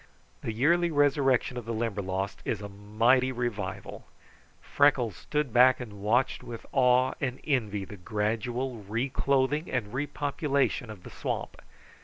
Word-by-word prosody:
The - - -3
yearly 170 +10 +2
resurrection 140 -4 +2
of 120 - -5
the 115 0 -3
Limberlost 100 -3 -3
is - - -2
a 105 - -6
mighty 115 +6 +2
revival. 115 -6 -4 0.5
Freckles 135 - +2
stood 150 0 -2
back 130 +1 +6
and 105 -5 -8
watched 120 +6 +1
with 115 -1 -8
awe 130 -1 +4
and 130 -2 -2
envy 105 -9 -1
the 105 - -10
gradual 115 +6 -2
reclothing 130 - 0
and 120 -5 -2
repopulation 140 -2 -1
of 105 -4 -10
the - - -10
swamp. - - -4
125 Hz, 135 wpm, -28 LUFS, 105-135 Hz, 0.5 s, back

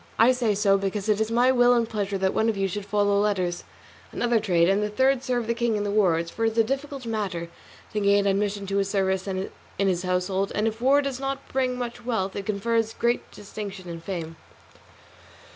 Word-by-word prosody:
I 230 +3 +6
say 240 -5 +1
so 195 -1 +3
because 195 +1 -3
it 210 0 +2
is 220 - 0
my 245 +3 +4
will 245 -1 +5
and 235 -1 +1
pleasure 205 -2 -2
that 190 0 0
one 220 - +2
of 220 - -1
you 195 0 +1
should 200 +2 -5
follow 205 0 +2
letters, 185 -4 0 0.5
another 240 -1 +1
trade, 175 -5 +2
and 195 +2 +2
the 210 - -1
third 260 +4 +2
serve 250 -3 -1
the 235 - 0
king 235 -1 0
in 205 - -1
the 205 - -2
wars, 170 -5 +2
for 225 - -4
it 225 0 +2
is - - -12
a 225 - +6
difficult 270 +2 -4
matter 195 -7 -3 0.4
to 215 - 0
gain 200 0 +3
admission 200 0 0
to 195 0 -2
his 195 0 +1
service 190 -1 0
in 190 0 -3 0.3
his 190 -3 +1
household, 185 +1 -1
and 210 +1 +1
if 225 +1 -4
war 280 +3 +4
does 275 -2 -3
not 275 0 -4
bring 255 -1 0
much 245 0 -5
wealth 220 -6 -2
it 200 - -5
confers 225 +2 0
great 235 0 0
distinction 200 -2 -8
and 165 -1 -7
fame. 165 -3 -5
210 Hz, 220 wpm, -25 LUFS, 195-235 Hz, 0.5 s, I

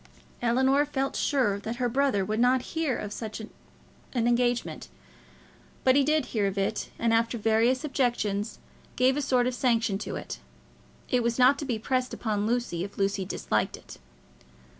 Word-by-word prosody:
Ellinor 260 +4 +3
felt 275 -2 -2
sure 245 -9 +1
that 220 +3 -4
her 245 0 0
brother 240 -5 +1
would 215 +2 -2
not 250 +1 +3
hear 320 -6 0
of 205 0 -5
such 220 -1 -6
an 220 - -8 0.7
engagement, 240 - 0 1.0
but 260 0 +5
he 280 - +5
did 305 -1 +2
hear 210 -4 +2
of 195 0 -4
it, 200 +2 -1
and, 230 -1 +1
after 230 +1 +2
various 225 +5 +2
objections, 235 -7 -1 0.4
gave 260 +1 +3
a 295 - 0
sort 255 -3 +2
of 250 - 0
sanction 230 -5 +1
to - - -5
it. - - -6 0.7
It 250 -2 +2
was 235 0 0
not 260 +2 +5
to 290 - -4
be 245 -5 -1
pressed 255 +3 -1
upon 210 -2 -1
Lucy 235 -8 -1
if 200 - -8
Lucy 195 -1 0
disliked 185 - -1
it. - - -13
240 Hz, 170 wpm, -27 LUFS, 215-260 Hz, 1.0 s, but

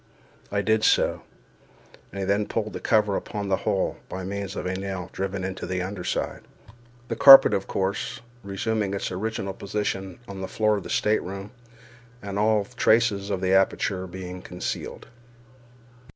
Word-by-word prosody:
I 100 0 0
did 110 +1 +2
so, - - +3 0.9
and - - -9
he - - -1
then 100 +2 +1
pulled 110 -1 -2
the - - -5
cover 105 -3 +2
upon 100 0 -4
the 95 - +2
hole, 100 -2 0
by 95 - -5
means 100 +1 -4
of - - -4
a 90 - -1
nail 95 -2 -5
driven 95 0 -3
into 95 -1 -4
the 90 0 -2
under 95 -1 -5
side—the 120 +6 -6
carpet, 135 -1 +10
of 95 - -1
course, 100 +5 -2 0.2
resuming 100 +1 -2
its 100 - -3
original 100 0 -3
position 95 -2 -3
on 95 -2 -7
the 95 - -3
floor 110 0 +1
of 100 - -6
the - - -9
stateroom, 100 -1 -1 0.7
and 100 -1 -4
all 105 -1 +3
traces 110 -3 +2
of 95 -2 -2
the 95 0 +1
aperture 95 0 +1
being 90 0 -7
concealed. 90 -1 -5
100 Hz, 160 wpm, -25 LUFS, 95-105 Hz, 0.9 s, carpet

